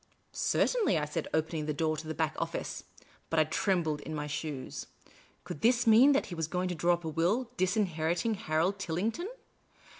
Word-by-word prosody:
" -, -, -41 dB, 0.2 s
Certainly," 450 Hz, -, +2 dB
I 150 Hz, -, 0 dB
said, 150 Hz, -, -3 dB
opening 160 Hz, -1 st, -1 dB
the 150 Hz, -, -1 dB
door 155 Hz, 0 st, +1 dB
into 155 Hz, +1 st, -7 dB
the 160 Hz, -, -4 dB
back 160 Hz, -2 st, 0 dB
office. -, -, -4 dB, 0.4 s
But 165 Hz, -, +2 dB
I -, -, +6 dB
trembled 160 Hz, -2 st, 0 dB
in 155 Hz, -, -6 dB
my 150 Hz, -1 st, -3 dB
shoes. 145 Hz, -2 st, -5 dB, 0.6 s
Could 145 Hz, -, -7 dB
this 240 Hz, +1 st, +3 dB
mean 235 Hz, +6 st, +7 dB
that 280 Hz, -, +2 dB
he 190 Hz, -, -8 dB
was 165 Hz, -2 st, -2 dB
going 180 Hz, +2 st, -1 dB
to -, -, -1 dB
draw 175 Hz, +1 st, +2 dB
up 170 Hz, -1 st, -11 dB
a -, -, -1 dB
will, 195 Hz, +11 st, 0 dB
disinheriting 185 Hz, 0 st, +1 dB
Harold 185 Hz, 0 st, 0 dB
Tillington 205 Hz, -, -2 dB
170 Hz, 190 wpm, -31 LUFS, 155-205 Hz, 0.6 s, mean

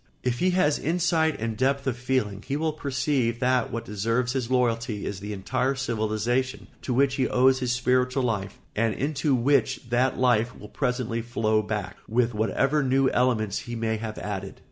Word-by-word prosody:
If 125 Hz, -1 st, -1 dB
he 185 Hz, -, +3 dB
has 150 Hz, -5 st, +3 dB
insight 165 Hz, -1 st, +1 dB
and 115 Hz, 0 st, -2 dB
depth 135 Hz, +3 st, +1 dB
of 130 Hz, -3 st, 0 dB
feeling 120 Hz, -5 st, -1 dB
he 140 Hz, -, -3 dB
will 155 Hz, 0 st, 0 dB
perceive 130 Hz, -4 st, -1 dB
that 125 Hz, -1 st, +1 dB
what 115 Hz, 0 st, -4 dB
deserves 115 Hz, +4 st, -1 dB
his 130 Hz, -3 st, -2 dB
loyalty 115 Hz, -4 st, 0 dB
is 100 Hz, -, -4 dB
the 105 Hz, +1 st, -6 dB
entire 130 Hz, +7 st, -1 dB
civilisation 120 Hz, +1 st, -1 dB, 0.2 s
to -, -, -4 dB
which 130 Hz, +2 st, +2 dB
he 130 Hz, -2 st, +2 dB
owes 130 Hz, +1 st, +4 dB
his 125 Hz, -2 st, -1 dB
spiritual 125 Hz, +1 st, +1 dB
life 100 Hz, -5 st, -2 dB, 0.2 s
and 115 Hz, 0 st, +1 dB
into 140 Hz, 0 st, 0 dB
which 130 Hz, -1 st, +1 dB
that 125 Hz, +2 st, +2 dB
life 120 Hz, -1 st, +2 dB
will 105 Hz, -, -11 dB
presently 125 Hz, -2 st, -1 dB
flow 110 Hz, -2 st, +1 dB
back, 105 Hz, -1 st, -4 dB
with 120 Hz, +1 st, +1 dB
whatever 135 Hz, +7 st, +1 dB
new 135 Hz, 0 st, +3 dB
elements 110 Hz, -5 st, +1 dB
he 120 Hz, -1 st, -6 dB
may 110 Hz, -1 st, -1 dB
have 110 Hz, -1 st, -5 dB
added. 100 Hz, -1 st, -5 dB
125 Hz, 180 wpm, -26 LUFS, 110-130 Hz, 0.2 s, owes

